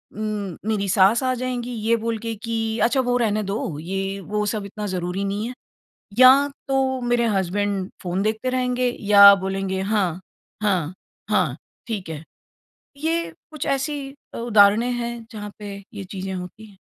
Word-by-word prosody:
उम, 210 -4 -3
मेरी 210 -2 0
सास 195 +6 +4
आ 255 0 +2
जाएँगी, 250 -1 -3
ये 230 0 +1
बोल 230 -1 -1
के 230 +1 -4
कि, 225 0 -2
"अच्छा, 265 +3 +3
वो 245 -1 0
रहने 215 -3 +1
दो, 195 +2 -2 0.2
ये 195 +4 -3
वो 210 +2 -2
सब 205 -1 -2
इतना 210 +1 -6
ज़रूरी 185 +1 -2
नहीं 205 +3 -2
है।" 250 - -5 0.7
या 255 0 +11 0.4
तो 265 -1 +1
मेरे 240 -1 +1
हसबैंड 195 +1 -1
फ़ोन 180 +2 -1
देखते 220 +4 -1
रहेंगे 250 -1 +1 0.2
या 200 0 +10
बोलेंगे, 195 0 -2
"हाँ, 195 -4 0 0.4
हाँ, 185 -5 +1 0.4
हाँ, - - +2 0.3
ठीक 200 -7 -4
है।" 160 -1 -6 0.7
ये 330 +3 -1 0.2
कुछ 310 -3 -5
ऐसी 290 +2 -3 0.3
अ, - - -5
उदाहरणे 220 0 +5
हैं, 235 -1 -4
जहाँ 210 -1 -6
पे 205 -1 -7 0.2
ये 200 -2 -6
चीज़ें 190 0 -6
होती 180 +4 -7
हैं। 205 -2 -18
215 Hz, 165 wpm, -23 LUFS, 195-240 Hz, 0.7 s, या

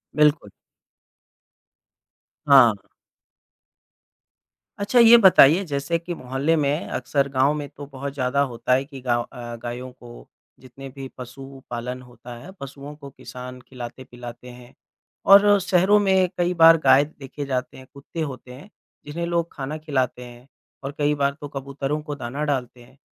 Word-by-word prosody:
बिल्कुल। 150 -7 +2 2.0
हाँ। 130 -6 +7 2.1
अच्छा 205 +5 +2
ये 235 0 +9
बताइए 185 -4 +6
जैसे 140 +4 -1
कि 175 +1 -6
मोहल्ले 135 +4 -1
में 150 +1 -1
अक्सर 140 -1 -1
गाँव 135 +2 +2
में 145 -1 -5
तो 145 - -10
बहुत 140 +1 -6
ज़्यादा 140 0 0
होता 120 +2 -1
है 135 +1 +2
कि 135 -2 -11
गाँव 120 -1 0
अ, 120 -1 -9
गायों 125 +2 -6
को 120 -1 -14 0.3
जितने 130 +2 -12
भी 135 0 -9
पशु-पालन 125 -1 -8
होता 125 -1 -12
है 190 - -11
पशुओं 140 +1 -9
को 140 -2 -11
किसान 125 -1 -10
खिलाते-पिलाते 120 -1 -10
हैं 125 +1 -14 0.5
और 200 0 +7
शहरों 190 +2 +3
में 190 -2 +2
कई 175 0 +1
बार 165 0 +9
गाय 140 - +6
देखे 145 -1 -9
जाते 130 -2 -3
हैं 130 - -13
कुत्ते 140 +4 -8
होते 125 0 -12
हैं 145 +11 -13 0.4
जिन्हें 170 +4 -4
लोग 170 -1 -1
खाना 145 +2 -5
खिलाते 130 -5 -2
हैं 120 +2 -14 0.4
और 135 - -4
कई 150 0 +1
बार 140 -1 0
तो 145 - -6
कबूतरों 140 +2 -4
को 150 -1 -6
दाना 135 +2 -5
डालते 125 -4 -3
हैं, 130 +3 -21
140 Hz, 150 wpm, -23 LUFS, 125-150 Hz, 2.1 s, ये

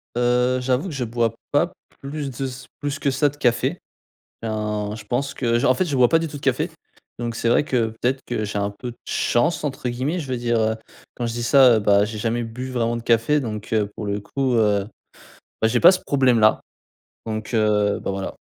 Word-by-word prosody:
Heu, 125 +1 +2
j'avoue 130 +7 0
que - - -7
je 130 -2 -2
bois 115 -1 0 0.2
pas - - +2 0.3
plus 140 +1 -4
de 130 +2 -5
s 130 0 -7
plus 145 0 -3
que 140 - +1
ça 145 +3 +2
de 145 - -14
café. 125 +5 +1 0.6
Ben, 105 -1 -2
je 110 - -9
pense 135 +5 -2
que 120 -3 +1
j 130 - 0
en 130 - +5
fait, 185 - +1
je 145 -5 -2
bois 125 -2 +5
pas 165 - +4
du 165 - -2
tout 150 - -7
de - - -13
café, 135 -4 0 0.5
donc 120 -1 -3
c'est 115 - -1
vrai 120 - +4
que, 125 -6 +1
peut-être 130 +2 +1
que 110 -3 -2
j'ai 105 0 -3
un 100 0 -1
peu 120 +5 -7
de 120 - -16
chance, 150 +7 +1
entre 130 -4 -3
guillemets. 130 +9 -2
Je 150 - -6
veux 130 -1 -2
dire, 120 -1 0
heu, 110 0 +1 0.4
quand 120 - -2
je 115 - -3
dis 120 0 -3
ça, 130 -1 +6
heu, - - +2
bah, 100 -1 +4
j'ai 110 +1 -6
jamais 115 +2 -1
bu 125 +3 -6
vraiment 120 -1 0
de 115 - -7
café, 115 +6 +3
donc 110 -5 -5
heu, 105 -2 +2
pour 105 - -5
le 100 0 -1
coup, 130 +5 -1
heu, 105 -3 +2 0.7
bah, 110 - +4
j'ai 120 +2 +1
pas 175 - +9
ce 185 - 0
problème-là, 125 -6 +3 0.7
donc 110 0 -4
heu, 105 -2 +2
bah, - - -3
voilà. 95 0 -4
120 Hz, 235 wpm, -22 LUFS, 110-135 Hz, 0.7 s, pas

